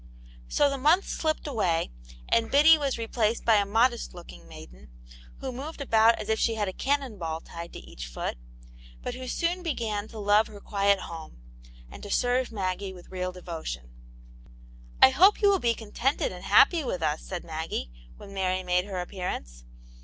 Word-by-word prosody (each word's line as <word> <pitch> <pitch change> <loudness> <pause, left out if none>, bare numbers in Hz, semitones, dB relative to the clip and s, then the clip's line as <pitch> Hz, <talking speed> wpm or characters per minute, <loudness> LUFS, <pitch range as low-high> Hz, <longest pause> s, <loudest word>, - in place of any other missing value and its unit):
So 290 - +3
the 275 -1 -2
month 320 +8 +4
slipped 310 -1 -1
away, 190 - 0 0.4
and 230 -1 +2
Biddy 300 +4 +7
was 285 -4 -1
re 230 - -3
placed 225 0 0
by 225 -2 +5
a 200 -1 +1
modest 230 0 +1
looking 175 - -12
maiden, 60 +2 -13 0.5
who 265 - -3
moved 280 +6 -7
about 230 -4 +4
as 215 - -6
if 220 0 +1
she 225 - +1
had 210 -2 -1
a 190 - -3
cannon 270 -5 -1
ball 160 -2 -3
tied 170 +1 -9
to - - -7
each - - -9
foot, - - -4 0.7
but - - -3
who 255 +1 -7
soon 345 +6 -1
began 220 - -2
to 225 - -11
love 210 +1 +3
her 205 - -11
quiet 200 -1 +1
home, 160 - -9 0.5
and - - -10
to 205 - -8
serve 245 +3 +1
Maggie 190 -2 -3
with 180 0 -14
real 185 0 -3
devotion. 160 - -7 0.6
" - - -21
I 265 - +9
hope 370 +10 +5
you 410 - +5
will 390 - +2
be 235 -5 +1
contented 255 - -1
and - - -9
happy 335 -3 +5
with 185 -10 -3
us,*' 155 0 0
said 180 -2 -5
Maggie, 160 - -4 0.3
when 200 - -11
Mary 185 -1 -1
made 180 0 +1
her 195 -3 -4
appearance. 175 - -6
205 Hz, 190 wpm, -27 LUFS, 175-255 Hz, 0.7 s, I